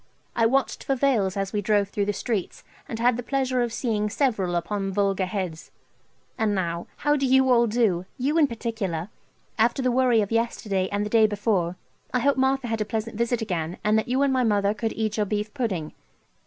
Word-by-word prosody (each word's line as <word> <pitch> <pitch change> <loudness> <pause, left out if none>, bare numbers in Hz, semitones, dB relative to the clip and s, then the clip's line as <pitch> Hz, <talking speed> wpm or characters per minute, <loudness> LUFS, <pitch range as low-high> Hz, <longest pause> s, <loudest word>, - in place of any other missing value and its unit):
I 230 -1 +4
watched 270 +3 0
for 270 - 0
veils 225 -8 +1
as 195 +1 -2
we 210 - 0
drove 205 -1 +1
through 200 0 -1
the 205 - 0
streets, 205 -2 -3 0.3
and 225 - -4
had 235 +1 +2
the - - -3
pleasure 255 0 0
of 240 -1 -1
seeing 215 -3 -1
several 205 -8 0
upon 195 +3 -2
vulgar 195 -1 +1
heads. 185 -5 -4 0.7
And 215 -2 +1
now, 170 -2 -2
how 295 0 +2
do 275 -2 0
you 265 0 +4
all 235 -1 +5
do? 210 -6 +1
you 280 +4 0
in 300 - +5
particular, 220 -8 -3 0.5
after 235 +4 +2
the 255 - +2
worry 245 -2 +3
of 205 - -3
yesterday 215 -4 0
and 205 +1 -1
the - - -4
day 220 -2 +5
before. 200 -4 0 0.4
I - - +3
hope 280 +2 +3
Martha 265 0 +1
had 225 -2 -2
a - - +3
pleasant 220 +1 -3
visit 235 +1 0
again, 175 -4 -3
and 210 +1 +3
that 220 - -4
you 260 +3 +1
and 275 -1 +2
my 255 -1 +2
mother 205 -2 +2
could 225 +1 -3
eat 215 -1 -2
your 210 -1 +1
beef 210 +1 -2
pudding. 195 - -2
220 Hz, 210 wpm, -25 LUFS, 200-245 Hz, 0.7 s, all